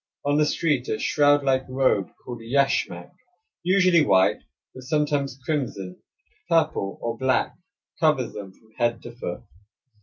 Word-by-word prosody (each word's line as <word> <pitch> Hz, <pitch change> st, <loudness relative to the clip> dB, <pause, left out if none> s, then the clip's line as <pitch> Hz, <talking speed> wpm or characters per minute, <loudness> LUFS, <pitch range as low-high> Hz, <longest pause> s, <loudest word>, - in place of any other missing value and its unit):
On 145 Hz, +1 st, +2 dB
the 150 Hz, -, +3 dB
street 145 Hz, -5 st, 0 dB
a 110 Hz, -, -1 dB
shroud 145 Hz, -1 st, +3 dB
like 130 Hz, -1 st, +2 dB
robe 130 Hz, -7 st, +1 dB, 0.2 s
called 120 Hz, -2 st, -7 dB
yashmak, 115 Hz, -8 st, 0 dB, 0.5 s
usually 185 Hz, -2 st, +4 dB
white, 95 Hz, -7 st, +3 dB, 0.3 s
but 130 Hz, -, -10 dB
sometimes 140 Hz, -1 st, -1 dB
crimson, 110 Hz, -, -3 dB, 0.5 s
purple, 155 Hz, -, +1 dB
or 115 Hz, 0 st, -2 dB
black, 130 Hz, 0 st, +1 dB, 0.4 s
covers 150 Hz, -7 st, +2 dB
them 100 Hz, -2 st, -8 dB
from 110 Hz, +3 st, -26 dB
head 120 Hz, -1 st, 0 dB
to 120 Hz, -, -8 dB
foot. 120 Hz, -7 st, -6 dB
130 Hz, 140 wpm, -24 LUFS, 115-150 Hz, 0.5 s, usually